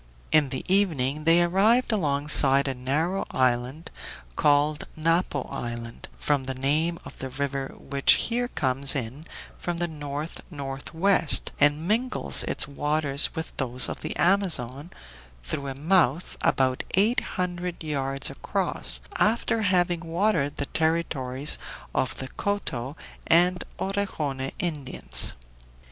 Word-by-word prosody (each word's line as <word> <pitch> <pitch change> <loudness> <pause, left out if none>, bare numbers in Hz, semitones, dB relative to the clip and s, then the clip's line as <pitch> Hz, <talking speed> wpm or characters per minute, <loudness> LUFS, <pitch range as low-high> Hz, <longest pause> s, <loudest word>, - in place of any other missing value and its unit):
In 150 -3 +4
the 130 - -5
evening 155 -7 +1
they 170 +1 +5
arrived 210 +9 +3
alongside 145 -6 +4
a 135 - -1
narrow 150 +9 -1
island, 130 +5 -1 0.4
called 145 +1 +2
Napo 165 -3 0
Island, 120 -1 -6
from 145 -3 0
the 130 0 -4
name 155 +6 0
of - - -12
the 130 - -5
river 135 0 -4
which 140 0 +3
here 245 +1 0
comes 135 - +3
in 135 +4 -5 0.3
from 175 -1 -3
the 175 0 0
north 150 0 -6
northwest, 160 +4 +2
and 145 +3 +2
mingles 215 - +2
its - - +1
waters 145 0 +1
with 160 - -6
those 125 -2 +3
of - - -6
the 155 - -5
Amazon 170 -7 0 0.5
through 140 - -4
a 135 - -5
mouth 160 0 +1
about 130 -1 +1
eight 220 +7 +3 0.2
hundred 180 -1 -3
yards 135 -3 -2
across, 60 0 -1 0.2
after 225 +1 +1
having 180 -3 +1
watered 165 -3 0
the 140 - -2
territories 150 -4 0 0.3
of 130 - -1
the 130 - -5
Coto 145 -10 -3 0.3
and 180 +2 +4
Orejone 155 -9 -3
Indians. 150 -7 0
150 Hz, 125 wpm, -25 LUFS, 135-175 Hz, 0.5 s, they